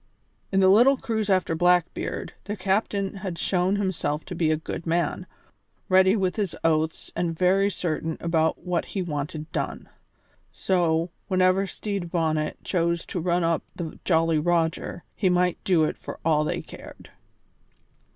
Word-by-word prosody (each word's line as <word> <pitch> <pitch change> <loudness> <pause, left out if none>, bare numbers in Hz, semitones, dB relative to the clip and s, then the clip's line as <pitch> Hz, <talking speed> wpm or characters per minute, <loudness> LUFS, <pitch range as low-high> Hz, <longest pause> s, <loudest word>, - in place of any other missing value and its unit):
In 195 0 +3
the 190 - +6
little 240 +8 +6
cruise 220 -4 -2
after 185 -3 +2
Blackbeard 175 +1 +1
their 205 - -3
new 185 - -15
captain 200 0 0
had 190 -3 -5
shown 185 +2 +1
himself 170 -7 -2
to 185 - -6
be 165 -2 +1
a 155 - +2
good 160 +1 -6
man, 170 +2 0 0.6
ready 190 +1 +5
with 190 -2 0
his 200 -5 -1
oaths 160 0 0
and 165 -2 -1
very 190 +3 +3
certain 160 -3 -3
about 160 0 0
what 180 -2 0
he 195 - -3
wanted 150 -1 -4
done. - - -4 0.6
So, 170 -2 +1 0.2
whenever 185 0 +3
Stede 200 -3 -4
Bonnet 155 -3 0
chose 170 -2 0
to 180 - -4
run 175 +1 +1
up 165 -1 +1
the 165 -3 -6
Jolly 165 -2 +2
Roger, 170 +1 0
he 190 - +2
might 180 0 +1
do 175 -4 +3
it 155 - -1
for - - -7
all 155 -2 +3
they - - -2
cared. - - -12
175 Hz, 160 wpm, -25 LUFS, 165-190 Hz, 0.6 s, the